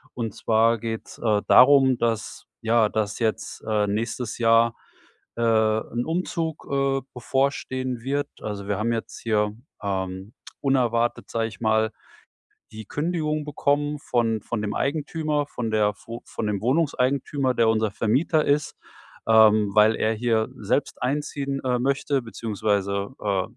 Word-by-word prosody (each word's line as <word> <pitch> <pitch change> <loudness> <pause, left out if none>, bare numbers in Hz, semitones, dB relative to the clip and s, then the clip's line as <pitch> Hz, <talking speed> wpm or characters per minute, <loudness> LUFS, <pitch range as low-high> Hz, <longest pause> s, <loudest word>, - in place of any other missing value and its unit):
und 115 -4 -3
zwar 115 +1 +3
geht's, 115 0 -6
äh, 105 -3 +1
darum, 130 -1 +6
dass 115 -2 -2
ja, 115 -1 +3
dass 110 +1 -2
jetzt, 110 -2 -2
äh, 105 -2 +1
nächstes 115 +3 -3
Jahr, 115 0 +4 0.6
äh, - - -2
'n 110 +1 +1
Umzug, 165 -1 -3
äh, 135 0 +1
bevorstehen 130 -1 -1
wird. 140 +3 -1
Also, 100 -2 -5
wir 100 - -1
haben 115 +2 0
jetzt 115 -1 -4
hier, 105 -2 +1 0.3
ähm, 95 +1 -4 0.3
unerwartet, 120 -4 +1
sage 115 -1 -1
ich 110 -1 -12
mal, 110 0 +2 0.8
die 110 -1 -9
Kündigung 155 0 -2
bekommen 145 0 0
von 115 -5 0
von 110 0 -4
dem 105 -1 -2
Eigentümer 150 0 -1
von 120 -5 -4
der 105 -1 +2
vo 115 +1 -7
von 110 - -5
dem 105 -2 -2
Wohnungseigentümer, 135 0 +1
der 115 -2 +2
unser 110 -1 +2
Vermieter 130 +10 +1
ist, 145 +1 +1 0.5
ähm, 110 -2 +5
weil 110 +1 +5
er 110 +1 +1
hier 110 0 +1
selbst 120 +5 -2
einziehen, 140 0 -2
äh, 125 -1 +1
möchte 140 0 0
beziehungsweise, 105 -2 -2
äh, 100 -3 0
115 Hz, 140 wpm, -24 LUFS, 110-135 Hz, 0.8 s, darum